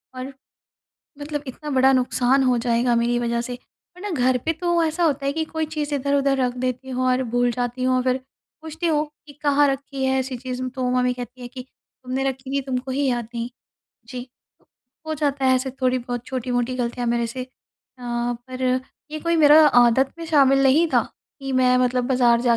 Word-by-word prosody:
और, 255 +2 -6 0.9
मतलब 295 0 -4
इतना 300 +4 -7
बड़ा 265 -1 +4
नुकसान 255 +1 +2
हो 250 -1 +3
जाएगा 235 0 +1
मेरी 235 +1 +1
वज़ह 235 0 -1
से। 245 +1 -5 0.4
वरना 410 +3 -5
घर 260 -6 +2
पे 325 - +1
तो 345 +1 +1
ऐसा 320 +2 0
होता 285 -4 +1
है 275 - +1
कि 320 +1 -1
कोई 320 0 -3
चीज़ 305 -1 -4
इधर-उधर 280 0 +1
रख 250 -1 +1
देती 255 +1 -3
हूँ 255 0 -1
और 255 +1 +2
भूल 245 0 +1
जाती 245 +1 -3
हूँ, 255 0 +2
और 255 - +2
फिर 255 0 +1 0.4
पूछती 320 +2 -4
हूँ 305 -2 +2 0.2
कि 290 - -12
कहाँ 290 0 +4
रखी 270 0 -5
है 265 0 +2
ऐसी 260 -1 -3
चीज़, 255 0 -5
तो 255 0 -2
मम्मी 250 0 +2
कहती 250 0 -9
हैं 245 - -7
कि, 260 - -6 0.4
"तुमने 255 +1 -2
रखी 265 0 -8
थी, - - 0
तुमको 260 0 -3
ही 280 +2 0
याद 240 -2 -2
नहीं।" 235 +1 -3 0.6
जी। 250 0 -7 0.8
हो 315 - -2
जाता 285 -2 -1
है 260 - +5
ऐसे 265 +1 -2
थोड़ी-बहुत 250 -1 -1
छोटी-मोटी 250 -1 -2
गलतियाँ 245 0 -2
मेरे 235 0 +1
से। 255 +3 -5
अ, - - -25 0.5
पर 240 +1 -4 0.5
ये 310 - -4
कोई 335 +1 +1
मेरा 300 -1 +7
आदत 245 0 +4
में 335 - -6
शामिल 275 -4 +4
नहीं 280 +5 +4
था 240 - +5 0.4
कि 270 -1 -4
मैं 255 -1 +4
मतलब 250 0 +1
बाज़ार 245 -3 +4
जा 235 -1 +3
255 Hz, 200 wpm, -23 LUFS, 245-280 Hz, 0.9 s, मेरा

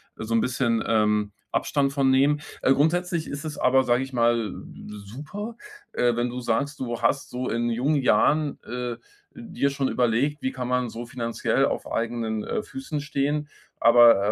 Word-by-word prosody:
so 110 +1 -4
'n 115 - +4
bisschen, 120 -2 0
ähm, 105 -1 +2 0.2
Abstand 140 -1 0
von 135 -2 +3
nehmen. 145 +2 +3 0.2
Äh, 135 - +4
grundsätzlich 170 +3 +1
ist 140 +3 -6
es 150 - -5
aber, 130 +1 +4
sage 125 +1 +2
ich 135 - -8
mal, 115 -3 +1 0.5
super, 155 - -7 0.4
äh, 120 -1 +2
wenn 120 +1 0
du 125 +1 -5
sagst, 140 +6 -1
du 120 -2 -4
hast 135 - +1
so 125 +1 -3
in 120 0 0
jungen 135 +5 +1
Jahren, 150 +2 +2
äh, 120 0 -4 0.4
dir 225 - -2
schon 135 -1 -1
überlegt: 125 +5 +1
Wie 130 - -1
kann 125 -1 -5
man 125 -1 0
so 120 +2 -7
finanziell 115 -1 0
auf - - -3
eigenen, 115 -2 -2
äh, - - -2
Füßen 265 - -5
stehen. 150 0 -1 0.3
Aber, 115 -3 +6
125 Hz, 170 wpm, -25 LUFS, 115-145 Hz, 0.5 s, Aber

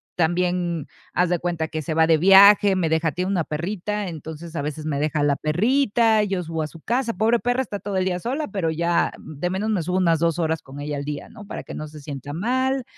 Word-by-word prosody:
también 175 -1 0 0.3
haz 180 -1 +2
de 175 -1 +1
cuenta 170 -2 -2
que 155 -2 -3
se 160 +2 -3
va 160 0 +5
de 165 -1 +5
viaje, 195 +2 +7
me 175 -3 0
deja 160 0 +1
tiene 180 +4 -2
una 180 -4 +1
perrita. 200 +6 -3
Entonces, 160 +1 -8
a 145 - -1
veces 150 +1 -5
me 145 -3 -1
deja 150 0 0
la 145 -1 +3
perrita, 220 - +2
yo 190 -3 -2
subo 160 -1 -3
a - - -3
su 165 - -13
casa. 240 +3 -1
Pobre 225 +2 +2
perra, 245 +2 0
está 205 -4 -6
todo 200 -1 -3
el 185 - +1
día 180 -1 -1
sola, 270 - -3
pero 190 -6 -1
ya 170 +2 +1
de 155 +3 -5
menos 195 +4 -2
me 200 -5 +1
subo 180 +3 -1
unas 170 -3 +3
2 165 0 +1
horas 160 -1 0
con 140 -1 -11
ella 145 0 -4
al 140 - -5
día, 145 -1 -5
¿no? 210 - -12
para - - -6
que - - -9
no 155 - -5
se 150 0 -11
sienta 140 -1 -7
mal. 260 - 0
175 Hz, 245 wpm, -23 LUFS, 155-205 Hz, 0.3 s, viaje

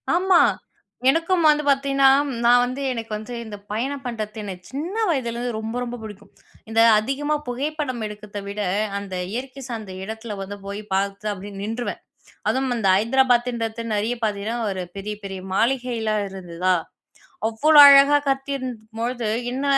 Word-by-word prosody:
ஆமா. 365 -1 +5 0.7
எனக்கும் 330 +2 +2
வந்து 300 0 +3
பார்த்தீங்கன்னா, 275 0 +3 0.4
நான் 245 +1 +6
வந்து 255 +3 -3
எனக்கு 225 -2 -6
வந்து 220 +3 -7
இந்த 210 -2 -7
பயணம் 270 +5 -2
பண்ணுறது 215 -2 -4
எனக்கு 185 -2 -8
சின்ன 325 +9 -4
வயதிலேருந்து 240 -4 -1
ரொம்ப, 225 +2 -5
ரொம்ப 245 0 -5
பிடிக்கும். 205 -2 -11 0.4
இந்த 225 0 +3 0.2
அதிகமா 275 +7 -1
புகைப்படம் 265 -2 -3
எடுக்கிறதவிட, 205 -1 -7 0.4
அந்த 200 -2 -7 0.2
இயற்கை 265 +3 -5
சார்ந்த 215 -5 -6
இடத்தில 220 +1 -6
வந்து 205 +1 -6
போய் 200 +1 -5
பார்த்தா, 200 +2 -1
அப்பிடியே 200 +1 -7
நின்றுவேன். 225 +3 -4 0.5
அதுவும் 260 -1 0
அந்த 200 -4 0
ஹைதராபாதின்றது 235 0 +1
நிறைய 220 +4 0
பார்த்தீங்கன்னா 210 +2 -1
ஒரு 185 -1 -3
பெரிய, 210 +2 -4
பெரிய 190 -1 -6
மாளிகைல்லாம் 230 -2 0
இருந்துதா! 185 -1 -1 0.7
அவ்ளோ 295 +7 +5
அழகா 280 +1 +8
கட்டியிருந்தபொழுது, 250 -4 -3 0.3
என்ன 265 +2 -3
230 Hz, 135 wpm, -23 LUFS, 210-270 Hz, 0.7 s, அழகா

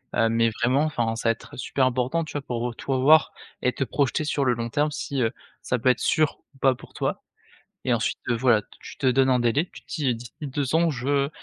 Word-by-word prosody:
heu, 115 - +3
mais 115 0 +3
vraiment, 130 +5 +3
enfin, 120 -7 -1
ça 115 0 0
va - - +6
être 115 - -8
super 130 +1 0
important, 130 +6 0
tu - - -10
vois? 145 - -2
Pour 120 -2 -3
heu, - - -7
tout 135 - -3
avoir 150 +5 +5 0.3
et 125 - +2
te - - -1
projeter 140 +3 0
sur 145 -1 0
le 125 - +3
long 115 0 -3
terme 150 +4 +1
si, 140 -2 -3
heu, 115 -2 +2 0.3
ça 125 - -1
peut 130 - +3
être 125 - +3
sûr 155 -2 +1
ou - - -21
pas 135 -1 +4
pour - - -15
toi - - -2 0.6
et - - +1
ensuite, - - -1
heu, 120 - +2
voilà, 115 -3 +3 0.2
tu - - -10
te 135 - -2
donnes 130 +1 +4
un 125 - +4
délai, 125 +8 +1
tu - - -12
te - - -41
dis: 155 -9 -1
«D'ici 115 -1 -10
2 140 0 -2
ans, 165 +1 +4
je 140 +1 0
130 Hz, 250 wpm, -25 LUFS, 120-145 Hz, 0.6 s, va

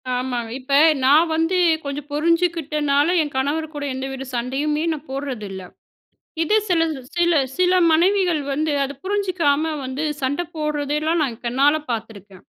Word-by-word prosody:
ஆமாங்க. 245 -2 -3
இப்ப 270 +2 -5 0.3
நான் 305 +5 +5
வந்து 325 +3 +1 0.3
கொஞ்சம் 280 +1 -5
புரிஞ்சுகிட்டனால, 305 -3 +1
என் 295 -2 -4
கணவர் 295 +4 -1
கூட 290 - -4
எந்த 265 +1 -4
வித 270 0 -7
சண்டையுமே 280 +6 -1
நான் 305 0 -9
போடுறதில்ல. 240 -9 -5 0.8
இது 375 +7 +2
சில 340 -2 +3 0.4
சில 345 -1 +3 0.2
சில 365 0 +3 0.2
மனைவிகள் 355 -1 +3
வந்து 305 +2 0
அதை 275 +1 -5
புரிஞ்சுக்காம 340 -7 0
வந்து, 260 +4 -4 0.2
சண்டை 270 +5 0
போடுறதெல்லாம் 300 +1 -1
நான் 240 -5 -4
கண்ணால 275 +5 +3 0.2
பாத்திருக்கேன். 205 -4 -7
295 Hz, 135 wpm, -21 LUFS, 265-325 Hz, 0.8 s, நான்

